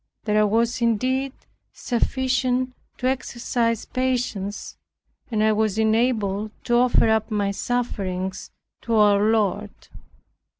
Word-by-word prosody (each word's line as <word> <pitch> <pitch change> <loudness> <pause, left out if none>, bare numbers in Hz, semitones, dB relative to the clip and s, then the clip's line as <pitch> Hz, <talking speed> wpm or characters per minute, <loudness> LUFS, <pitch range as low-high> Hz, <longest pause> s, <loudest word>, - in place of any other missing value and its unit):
There 210 -1 +2
was 230 +3 +1
indeed 255 +4 +1 0.4
sufficient 255 +1 0 0.2
to 250 - -5
exercise 235 -3 -1
patience, 245 -6 -2 0.5
and 215 -3 0
I 220 - +4
was 215 -1 0
enabled 220 -2 +1
to 240 -1 +2
offer 245 -1 +4
up 220 0 +1
my 205 -2 0
sufferings 195 -4 -3 0.3
to 230 -1 -1
our 205 -2 +5
Lord. 210 -1 +1
225 Hz, 110 wpm, -23 LUFS, 210-245 Hz, 0.5 s, our